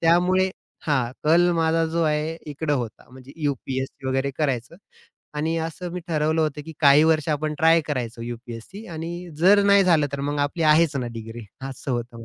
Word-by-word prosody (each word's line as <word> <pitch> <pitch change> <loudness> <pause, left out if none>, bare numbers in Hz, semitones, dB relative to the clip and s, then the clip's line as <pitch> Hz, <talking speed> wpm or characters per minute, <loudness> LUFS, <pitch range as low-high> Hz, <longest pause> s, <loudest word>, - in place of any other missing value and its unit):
त्यामुळे 180 +3 +3 0.4
हां, 130 -5 +1
कल 175 +3 +4
माझा 165 0 +2
जो 165 +1 -1
आहे 155 +1 0
इकडं 145 0 -1
होता, 120 -4 -5
म्हणजे 130 +1 -13
यू-पी-एस-सी 135 -2 -3
वगैरे 135 +1 0
करायचं 135 0 -1 0.6
आणि 160 +2 -1
असं 175 +2 -7
मी 180 - -4
ठरवलं 155 0 +1
होतं, 150 -1 -2
की 160 - -7
काही 145 0 +7
वर्ष 160 -1 +2
आपण 150 0 -1
ट्राय 165 +1 +5
करायचं 120 -5 -3
यू-पी-एस-सी 120 - -8
आणि 170 +1 -6
जर 200 +4 +6
नाही 200 -1 +5
झालं, 160 -5 +4
तर 140 - -3
मग 145 +1 -2
आपली 145 +4 -1
आहेच 155 -1 +4
ना 125 -2 -2
डिग्री 115 +1 -8 0.2
असं 135 +1 -7
होतं. 120 -1 -4
150 Hz, 175 wpm, -23 LUFS, 130-165 Hz, 0.6 s, काही